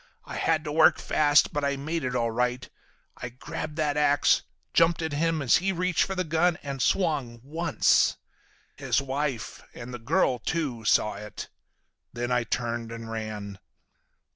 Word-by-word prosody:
I - - -8
had 160 -1 +1
to 150 - -4
work 160 0 +5
fast 145 -1 +3
but 145 - -1
I 140 0 +1
made 155 +3 -3
it 125 -1 -2
all 115 -2 0
right. 125 +2 -1 0.5
I 125 - -6
grabbed 135 +5 -6
that 150 -2 0
ax, 145 -1 +3 0.3
jumped 165 0 +3
at 160 -2 -3
him 160 0 0
as 130 - +5
he 195 +2 0
reached 180 -1 +1
for 195 - -4
the 185 - 0
gun, 165 +1 +1
and 140 -2 -4
swung—once. 150 -2 +1 0.6
His - - +1
wife, 135 -2 -3
and 125 +1 -8
the 120 - -6
girl 120 +2 +1
too, 130 -5 -3
saw 105 - +3
it. 105 0 -8 0.6
Then 120 +1 -3
I 125 -1 +1
turned 115 -1 -3
and 115 -1 -7
ran." 105 -3 -5
140 Hz, 165 wpm, -27 LUFS, 120-160 Hz, 0.6 s, work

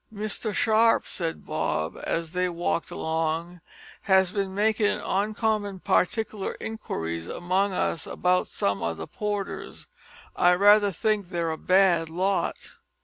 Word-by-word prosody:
"Mr 215 +1 -3
Sharp," 225 +3 +3
said 165 -3 -4
Bob, 85 - -2
as 165 -1 -2
they 180 0 0
walked 170 -1 -2
along, 165 +2 -2 0.4
"has 190 -2 +3
bin 195 -2 -2
makin' 210 0 +2
oncommon 205 0 -1
partikler 210 +2 0
inquiries 85 - -4
among 185 - 0
us 170 -3 -1
about 180 0 +1
some 100 0 -1
o' 85 0 -1
the - - -6
porters. 205 -1 -5 0.5
I 175 0 +5
raither 205 +2 +5
think 205 0 -1
they're 170 -2 -1
a - - -2
bad 180 -3 +3
lot." 190 +4 0
185 Hz, 130 wpm, -26 LUFS, 170-205 Hz, 0.5 s, I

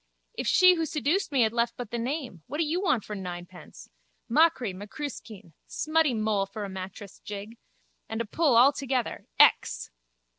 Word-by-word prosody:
If - - -4
she 365 -1 +6
who 330 -2 -1
seduced 310 +5 0
me 270 -3 +2
had 220 0 +1
left 235 0 0
but 245 -3 -7
the 235 - -2
name. 250 - -4
What 285 - -5
do 330 - +2
you 325 +4 -1
want 260 - +1
for 210 - -6
ninepence? 180 -1 -9 0.4
Machree, 255 - +3
macruiskeen. 210 - -8
Smutty 310 -4 +1
Moll 215 -2 0
for 205 +2 -6
a - - -7
mattress 190 +1 -8
jig. 210 +3 -8 0.5
And 220 - -3
a 230 - -1
pull 285 +3 +2
all 265 +4 +7
together. 260 -3 -3
_Ex! - - +4
235 Hz, 175 wpm, -27 LUFS, 205-295 Hz, 0.5 s, all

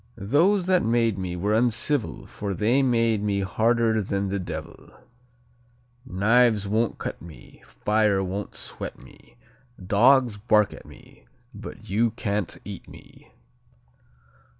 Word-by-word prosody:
"Those 165 - +2
that 185 -1 +3
made 115 -3 +1
me 90 -1 -4
were 100 +4 -1
uncivil 120 +3 0
For 100 -2 -5
they 115 +8 +2
made 115 -4 +2
me 100 -1 0
harder 110 +2 +1
than 100 0 -2
the 100 +1 -2
devil. 80 -3 -8 1.2
Knives 110 +1 +3
won't 110 +2 0
cut - - -6
me; 85 -2 -14
fire 105 -2 0
won't 95 +2 -5
sweat - - -6
me; - - -18 0.4
Dogs 115 +4 +3
bark 105 -1 +2
at - - -13
me, - - -17 0.3
but - - -10 0.3
can't 105 -6 -2
eat 100 -3 -8
me." - - -16
105 Hz, 125 wpm, -25 LUFS, 100-120 Hz, 1.2 s, that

